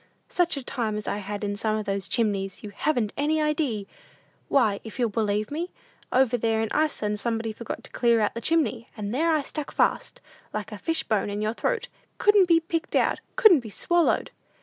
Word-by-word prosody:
"Such 350 -4 +1
a 275 - -4
time 225 -4 -2
as 210 - -5
I 205 - -1
had 205 +1 -5
in 205 0 -1
some 215 +1 0
of 215 - -4
those 195 -1 -2
chimneys, 200 -4 0
you 210 - -7
haven't 235 -2 0
any 305 +2 +1
idee! 295 -9 0 0.6
Why, 215 -7 +3
if 220 - -9
you'll 240 -3 +1
believe 210 0 0
me, 335 +4 -3 0.4
over 255 -1 +3
there 225 -1 +1
in 220 -1 0
Iceland 215 -9 0
somebody 225 0 -2
forgot 235 +1 -6
to - - -12
clear 235 -1 +3
out 210 - +1
the 230 - -5
chimney, 255 -7 +1
and 210 0 -4
there 325 +6 +2
I 310 -2 +2
stuck 300 +1 -5
fast, - - 0 0.4
like - - -4
a - - -7
fish 325 -1 0
bone 210 -2 0
in 205 0 -3
your 215 +1 0
throat; - - -1 0.3
couldn't 410 -3 +5
be 335 -1 +5
picked 330 0 -3
out, - - +2 0.2
couldn't 390 - +7
be 230 -3 -8
swallowed! 345 - +1
235 Hz, 205 wpm, -26 LUFS, 210-310 Hz, 0.6 s, couldn't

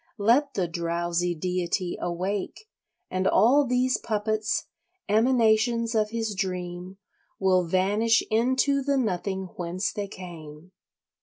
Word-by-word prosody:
Let 245 +7 +2
the 185 -3 0
drowsy 170 +1 -1
deity 180 +2 -2
awake 185 - -3 0.4
and 185 +1 0
all 275 +5 +4
these 250 +1 +1
puppets, 215 0 -1 0.4
emanations 230 +1 +2
of 215 -1 +1
his 225 -1 -2
dream, 180 -1 -4 0.4
will 185 -2 +2
vanish 205 +6 +2
into 260 +5 +2
the 280 +1 0
nothing 190 -4 -2
whence 180 +2 -2
they 205 -1 -4
came. 170 -3 -11
200 Hz, 110 wpm, -26 LUFS, 180-230 Hz, 0.4 s, all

